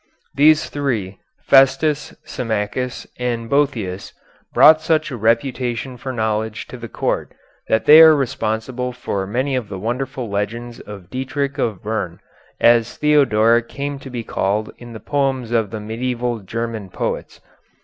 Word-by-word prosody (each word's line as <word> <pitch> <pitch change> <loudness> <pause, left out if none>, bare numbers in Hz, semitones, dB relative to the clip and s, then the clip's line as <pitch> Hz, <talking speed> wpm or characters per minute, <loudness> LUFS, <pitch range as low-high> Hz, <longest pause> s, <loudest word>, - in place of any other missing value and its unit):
These 155 +2 +4
three 115 -10 -3 0.2
Festus, 140 +2 +3
Symmachus, 115 +1 -3
and 120 -2 -2
Boëthius 115 -10 -1 0.4
brought 155 +1 +7
such 155 -1 +1
a - - -4
reputation 120 +2 -1
for 130 +2 -6
knowledge 110 -2 -2
to 125 - -8
the 115 -1 -8
court - - -2 0.3
that 110 - +1
they 155 +2 +9
are 160 -1 +9
responsible 125 -1 -2
for 100 -6 -3
many 130 +6 -1
of 125 -5 -3
the 95 - -5
wonderful 125 +4 -3
legends 115 +4 -4
of 100 -3 -11
Dietrich 140 +2 -3
of 110 -7 -2
Bern, 105 -5 -3 0.4
as 115 -1 +3
Theodoric 120 -6 +3
came 140 0 -4
to 135 - -10
be 120 -2 -5
called 105 +1 -2
in 120 -1 -10
the 110 - -8
poems 135 0 -1
of 115 -3 +1
the 110 - -5
medieval 120 +2 -3
German 110 0 -5
poets. - - -4
120 Hz, 145 wpm, -20 LUFS, 110-135 Hz, 0.4 s, they